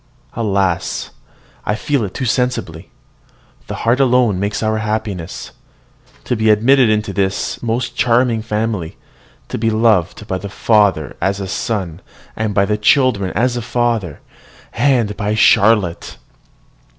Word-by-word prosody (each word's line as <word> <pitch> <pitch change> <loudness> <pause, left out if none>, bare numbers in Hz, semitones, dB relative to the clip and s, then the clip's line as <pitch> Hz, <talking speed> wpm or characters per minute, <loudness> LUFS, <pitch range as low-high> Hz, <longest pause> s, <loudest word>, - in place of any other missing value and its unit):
Alas! 100 -6 -1 0.5
I 105 - -1
feel 140 +1 -1
it 95 - -6
too 130 - -2
sensibly, 125 +2 -2 0.8
the - - -5
heart 120 +3 +3
alone 125 -7 +3
makes 100 +3 -2
our 110 0 0
happiness! 105 -5 -4 0.7
To 125 - -1
be 110 -1 +1
admitted 120 +4 +4
into 105 -2 0
this 95 0 -2
most 120 +1 -2
charming 120 -1 +2
family, 105 -5 -3 0.5
to - - -4
be 115 0 +1
loved 110 -3 +1
by 95 -2 -3
the 100 +2 -7
father 100 -7 +1
as 95 +1 0
a 95 - -4
son, 95 -3 -3 0.3
by 105 -2 +1
the 105 +1 -1
children 110 -5 +2
as 120 +4 +1
a 120 - -2
father, 115 - -1 0.5
and 120 -5 +1
by 105 +1 -1
Charlotte! 105 -5 +3
110 Hz, 135 wpm, -17 LUFS, 100-120 Hz, 0.8 s, admitted